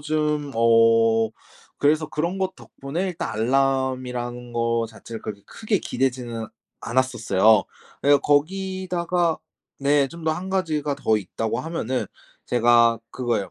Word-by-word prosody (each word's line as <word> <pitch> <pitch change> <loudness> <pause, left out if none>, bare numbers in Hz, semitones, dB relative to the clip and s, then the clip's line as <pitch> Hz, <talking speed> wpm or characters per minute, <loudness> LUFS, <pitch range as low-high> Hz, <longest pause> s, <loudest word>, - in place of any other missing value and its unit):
좀 150 -1 -1
어 115 -1 +4 0.5
그래서 155 +2 +2
그런 170 +5 -2
것 190 0 -1
덕분에 160 +8 -5
일단 175 - -4
알람이라는 125 0 -1
거 115 0 0
자체를 110 0 -10
그렇게 100 -2 -7
크게 215 -3 -1
기대지는 120 -3 -2 0.3
않았었어요. 115 -4 +3 0.4
그리고 145 0 +5
거기다가 180 +1 0 0.4
네, 140 0 +3
좀 170 +4 -11
더 160 - +2
1 185 +4 -5
가지가 155 -7 -1
더 110 - +2
있다고 105 +2 -3
하면은 130 -6 -2 0.4
제가 120 -1 +4
그거예요. 115 -8 -2
130 Hz, 275 characters per minute, -23 LUFS, 115-155 Hz, 0.5 s, 그리고